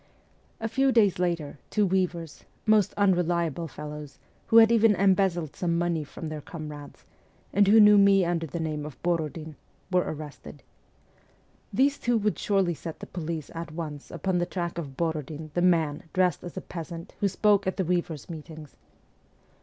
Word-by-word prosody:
A 225 - -2
few 265 +4 +2
days 205 -7 +3
later, 170 -5 -2
two 210 -1 +2
weavers 175 -4 -2 0.2
most 215 -2 +4
unreliable 175 -4 +1
fellows, 150 -1 -8 0.3
who 225 - +5
had 225 0 +8
even 225 -2 +5
embezzled 190 -4 +2
some 170 -2 0
money 170 -2 0
from 155 +3 -8
their 155 -1 -5
com 155 0 -8
rades, 145 -1 -11 0.5
and 200 +1 +4
who 220 +3 +7
knew 210 -1 +8
me 195 -2 +5
under 170 -1 -1
the 170 - -5
name 155 -2 -3
of 150 -4 -9
Borodin 160 -2 -2 0.4
were 180 -1 +4
arrested. 155 -3 -8 1.1
These 280 +2 +2
two 240 -1 +1
would 210 -1 0
surely 195 -4 +1
set 165 0 -8
the - - -7
police 165 -3 -5
at 165 -1 -6
once 155 -3 -6
upon 175 +2 -1
the 175 - -1
track 175 -2 -3
of 140 -5 -7
Borodin, 155 -2 -3
the 175 - 0
man, 165 -5 +2
dressed 185 -3 +1
as 175 - -8
a - - -3
peasant, 170 0 -8
who 200 - +2
spoke 200 0 +2
at 190 - -1
the 190 - 0
weavers' 170 -4 -2
meetings. 155 -2 -10
170 Hz, 170 wpm, -27 LUFS, 155-195 Hz, 1.1 s, had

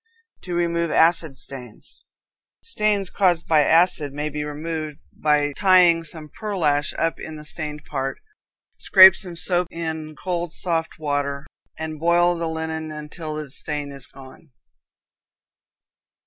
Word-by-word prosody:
To 180 -1 -5
Remove 170 -1 0
Acid 160 -4 +2
Stains. 125 -5 -10 0.6
Stains 210 - 0
caused 175 -4 +2
by 160 -2 +4
acids 160 -2 +3
may 150 +1 -2
be 150 0 -4
removed 155 0 -5 0.2
by 145 -1 +1
tying 180 -4 +5
some 155 -1 -8
pearlash 155 -7 -1
up 165 0 -1
in 160 - -7
the 150 0 -10
stained 150 -1 -5
part; 135 -2 -3 0.6
scrape 190 -2 +8
some 180 -2 -3
soap 175 +1 +1
in 160 -2 -5
cold, 175 -2 -3
soft 165 -2 -2
water, 145 -2 -2 0.3
and 155 -1 -5
boil 175 +2 +3
the 165 -1 -3
linen 160 -1 -4
until 155 +1 -7
the 150 -3 -6
stain 145 0 -4
is 140 -2 -5
gone. 135 +3 -15
160 Hz, 135 wpm, -22 LUFS, 150-170 Hz, 0.6 s, scrape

